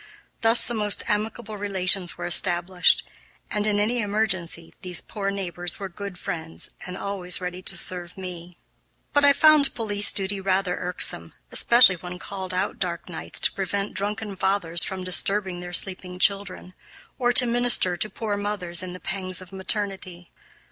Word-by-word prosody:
Thus 225 Hz, +1 st, +8 dB
the 240 Hz, -, -3 dB
most 210 Hz, -2 st, -1 dB
amicable 210 Hz, 0 st, -3 dB
relations 190 Hz, -2 st, 0 dB
were -, -, -5 dB
established, 175 Hz, +1 st, +3 dB, 0.4 s
and, 210 Hz, 0 st, -1 dB
in 205 Hz, -1 st, +1 dB
any 230 Hz, +4 st, +1 dB
emergency, 190 Hz, -6 st, -2 dB
these 180 Hz, -3 st, -4 dB
poor 200 Hz, -3 st, -4 dB
neighbors 175 Hz, -3 st, -3 dB
were 195 Hz, -1 st, -5 dB
good 200 Hz, 0 st, -8 dB
friends 165 Hz, -4 st, -5 dB, 0.2 s
and 180 Hz, 0 st, -6 dB
always 190 Hz, -3 st, -2 dB
ready 180 Hz, 0 st, -5 dB
to -, -, +2 dB
serve 180 Hz, 0 st, -1 dB
me. 180 Hz, -2 st, -9 dB, 0.6 s
But 290 Hz, -, +3 dB
I 285 Hz, -, +7 dB
found 300 Hz, -1 st, +5 dB
police 210 Hz, -3 st, +3 dB
duty 195 Hz, 0 st, -3 dB
rather 190 Hz, -1 st, 0 dB
irksome, 180 Hz, 0 st, 0 dB, 0.2 s
especially 235 Hz, -6 st, +6 dB
when 180 Hz, +1 st, -8 dB
called 190 Hz, 0 st, -7 dB
out 185 Hz, 0 st, -2 dB
dark 175 Hz, -1 st, -4 dB
nights 165 Hz, -, -2 dB
to -, -, +3 dB
prevent 200 Hz, +1 st, -3 dB
drunken 205 Hz, 0 st, -3 dB
fathers 190 Hz, -3 st, +1 dB
from 190 Hz, -1 st, -4 dB
disturbing 185 Hz, +1 st, 0 dB
their 175 Hz, 0 st, -7 dB
sleeping 180 Hz, 0 st, -1 dB
children, 195 Hz, -1 st, 0 dB, 0.5 s
or 245 Hz, -1 st, +2 dB
to 250 Hz, -, +5 dB
minister 240 Hz, -6 st, +3 dB
to 215 Hz, +5 st, -2 dB
poor 215 Hz, -2 st, -3 dB
mothers 200 Hz, -4 st, -2 dB
in 185 Hz, -1 st, -6 dB
the 180 Hz, -, -9 dB
pangs 190 Hz, -1 st, -4 dB
of 185 Hz, 0 st, -12 dB
maternity. 190 Hz, -2 st, -4 dB
190 Hz, 160 wpm, -24 LUFS, 180-205 Hz, 0.6 s, Thus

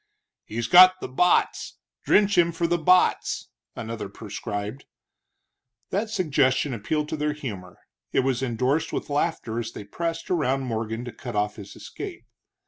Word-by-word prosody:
"He's 115 Hz, +2 st, -3 dB
got 185 Hz, +7 st, +8 dB
the -, -, -5 dB
botts 175 Hz, +8 st, +1 dB, 0.3 s
drench 205 Hz, -1 st, +4 dB
him 170 Hz, -1 st, +4 dB
for 170 Hz, +1 st, -1 dB
the 175 Hz, +1 st, +1 dB
botts," 180 Hz, +3 st, +2 dB, 0.3 s
another 110 Hz, -3 st, -5 dB
prescribed. 105 Hz, +3 st, -6 dB, 1.1 s
That 210 Hz, +4 st, -1 dB
suggestion 145 Hz, -, +1 dB
appealed 150 Hz, +7 st, -2 dB
to -, -, -2 dB
their 150 Hz, 0 st, 0 dB
humor. 100 Hz, -11 st, -7 dB, 0.3 s
It -, -, +3 dB
was 130 Hz, -1 st, 0 dB
endorsed 130 Hz, +4 st, 0 dB
with -, -, -4 dB
laughter 145 Hz, -6 st, -1 dB
as 115 Hz, -1 st, -5 dB
they -, -, -7 dB
pressed 165 Hz, -, -4 dB
around 135 Hz, -6 st, +1 dB
Morgan 115 Hz, -1 st, -3 dB
to 120 Hz, -, -6 dB
cut 120 Hz, 0 st, -8 dB
off 105 Hz, 0 st, 0 dB
his 100 Hz, -2 st, -10 dB
escape. -, -, -8 dB
130 Hz, 150 wpm, -25 LUFS, 115-165 Hz, 1.1 s, got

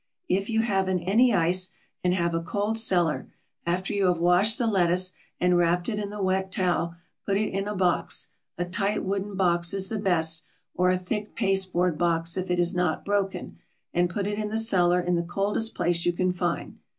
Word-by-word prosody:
If 195 Hz, -, 0 dB
you 225 Hz, 0 st, +2 dB
haven't 190 Hz, -5 st, 0 dB
any 230 Hz, +7 st, +4 dB
ice 185 Hz, -1 st, +2 dB, 0.3 s
and 180 Hz, -, +2 dB
have 170 Hz, -2 st, 0 dB
a 165 Hz, -, 0 dB
cold 205 Hz, +5 st, -1 dB
cellar, 175 Hz, -8 st, +1 dB, 0.4 s
after 180 Hz, +2 st, -1 dB
you 200 Hz, -2 st, +2 dB
have 180 Hz, -1 st, +2 dB
washed 180 Hz, +6 st, +3 dB
the 245 Hz, -, 0 dB
lettuce 185 Hz, -3 st, +2 dB, 0.3 s
and 180 Hz, 0 st, +3 dB
wrapped 175 Hz, +2 st, +2 dB
it 210 Hz, -2 st, -2 dB
in 205 Hz, -1 st, -3 dB
the 205 Hz, -1 st, -5 dB
wet 190 Hz, 0 st, 0 dB
towel, 175 Hz, -3 st, 0 dB, 0.3 s
put 195 Hz, -1 st, 0 dB
it 215 Hz, +1 st, -1 dB
in 195 Hz, +1 st, -2 dB
a 210 Hz, -, -3 dB
box; 180 Hz, -2 st, 0 dB, 0.3 s
a 175 Hz, -, -1 dB
tight 195 Hz, +4 st, -1 dB
wooden 195 Hz, +1 st, -3 dB
box 175 Hz, -1 st, +1 dB
is 190 Hz, -1 st, 0 dB
the 220 Hz, -, -2 dB
best, 165 Hz, -5 st, +1 dB, 0.3 s
or 180 Hz, 0 st, +2 dB
a 185 Hz, -, +2 dB
thick 205 Hz, +4 st, -4 dB
pasteboard 185 Hz, -5 st, +1 dB
box 170 Hz, -1 st, +1 dB
if 185 Hz, 0 st, -3 dB
it 180 Hz, -, +1 dB
is 175 Hz, 0 st, +1 dB
not 180 Hz, -3 st, -1 dB
broken; 195 Hz, -3 st, -2 dB, 0.3 s
and 175 Hz, 0 st, +2 dB
put 195 Hz, +3 st, -3 dB
it 205 Hz, +1 st, -2 dB
in 210 Hz, -1 st, -2 dB
the 220 Hz, -, -2 dB
cellar 180 Hz, -6 st, +3 dB
in 180 Hz, 0 st, -1 dB
the 170 Hz, -, +2 dB
coldest 200 Hz, +6 st, -1 dB
place 170 Hz, 0 st, 0 dB
you 175 Hz, -, +1 dB
can 185 Hz, +1 st, 0 dB
find. 175 Hz, -1 st, -3 dB
185 Hz, 205 wpm, -26 LUFS, 175-200 Hz, 0.4 s, any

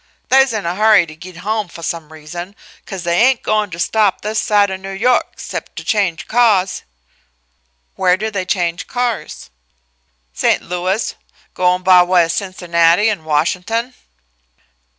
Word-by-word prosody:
They's 265 Hz, 0 st, +5 dB
in 215 Hz, -4 st, -3 dB
a 170 Hz, -, -1 dB
hurry 210 Hz, -2 st, +4 dB
to 155 Hz, -1 st, -12 dB
git 175 Hz, +2 st, -12 dB
home 215 Hz, -1 st, -1 dB
foh 170 Hz, -1 st, -12 dB
some 165 Hz, -2 st, -4 dB
reason, 175 Hz, +5 st, -8 dB, 0.3 s
'cause 190 Hz, -4 st, -6 dB
they 170 Hz, 0 st, +1 dB
ain' 260 Hz, +1 st, +4 dB
goin' 215 Hz, -1 st, 0 dB
to 165 Hz, -, -8 dB
stop 200 Hz, +3 st, +1 dB
this 215 Hz, +1 st, -2 dB
side 205 Hz, -2 st, +2 dB
o' -, -, -2 dB
New 190 Hz, +1 st, -9 dB
York, 230 Hz, +6 st, +1 dB
'cept -, -, -7 dB
to -, -, -7 dB
change 195 Hz, -7 st, -1 dB
cahs." 210 Hz, -6 st, +2 dB, 1.1 s
"Where 185 Hz, -1 st, +2 dB
do 220 Hz, +2 st, -3 dB
they 195 Hz, -3 st, -3 dB
change 175 Hz, -1 st, -2 dB
cars?" 245 Hz, -2 st, -3 dB, 0.8 s
"St. -, -, +1 dB
Louis 180 Hz, +4 st, -2 dB, 0.4 s
goin' 180 Hz, 0 st, +1 dB
by 180 Hz, -1 st, +7 dB
way 175 Hz, -1 st, +3 dB
of 165 Hz, -, -2 dB
Cincinnati 175 Hz, +1 st, +2 dB
an' 165 Hz, -7 st, -5 dB
Washin'ton." 180 Hz, +11 st, -1 dB
185 Hz, 155 wpm, -17 LUFS, 175-215 Hz, 1.1 s, by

